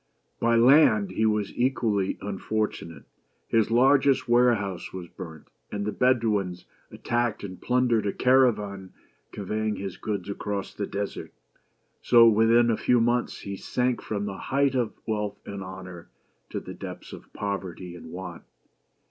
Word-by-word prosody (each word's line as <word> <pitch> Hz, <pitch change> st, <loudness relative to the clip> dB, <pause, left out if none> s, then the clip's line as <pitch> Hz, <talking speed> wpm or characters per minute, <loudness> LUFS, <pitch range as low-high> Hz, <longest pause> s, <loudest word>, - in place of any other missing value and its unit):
By 115 Hz, 0 st, +3 dB
land 150 Hz, -, +5 dB
he 110 Hz, -, +1 dB
was 105 Hz, -2 st, -1 dB
equally 115 Hz, -6 st, 0 dB
unfortunate; 100 Hz, -5 st, -3 dB, 0.4 s
his 115 Hz, -2 st, +2 dB
largest 130 Hz, +2 st, +4 dB
warehouse 120 Hz, -6 st, +2 dB
was 90 Hz, -2 st, -7 dB
burnt, 80 Hz, -4 st, -10 dB, 0.2 s
and 100 Hz, 0 st, -3 dB
the 105 Hz, -, -1 dB
Bedouins 105 Hz, -8 st, +1 dB, 0.2 s
attacked 120 Hz, -3 st, -2 dB
and 95 Hz, -3 st, -8 dB
plundered 125 Hz, -4 st, +2 dB
a -, -, +1 dB
caravan 105 Hz, -8 st, +2 dB, 0.4 s
convey 110 Hz, +2 st, -3 dB
ing 105 Hz, -, 0 dB
his 95 Hz, -2 st, -6 dB
goods 100 Hz, -4 st, -4 dB
across 100 Hz, 0 st, -4 dB
the 100 Hz, -, -4 dB
desert. 100 Hz, 0 st, -5 dB, 0.7 s
So, 120 Hz, -1 st, +7 dB
within 115 Hz, +2 st, +4 dB
a 110 Hz, -, 0 dB
few 125 Hz, -1 st, +3 dB
months, 120 Hz, +1 st, 0 dB
he 100 Hz, 0 st, -5 dB
sank 125 Hz, +4 st, -1 dB
from 105 Hz, -1 st, -3 dB
the 100 Hz, -1 st, -4 dB
height 140 Hz, 0 st, +1 dB
of 125 Hz, -4 st, 0 dB
wealth 105 Hz, -2 st, -2 dB
and 100 Hz, -1 st, -6 dB
honor 95 Hz, -2 st, -9 dB, 0.4 s
to -, -, -3 dB
the -, -, -9 dB
depths -, -, -9 dB
of -, -, -12 dB
poverty 95 Hz, -3 st, -5 dB
and 85 Hz, -, -11 dB
want. 90 Hz, 0 st, -7 dB
105 Hz, 150 wpm, -26 LUFS, 100-120 Hz, 0.7 s, So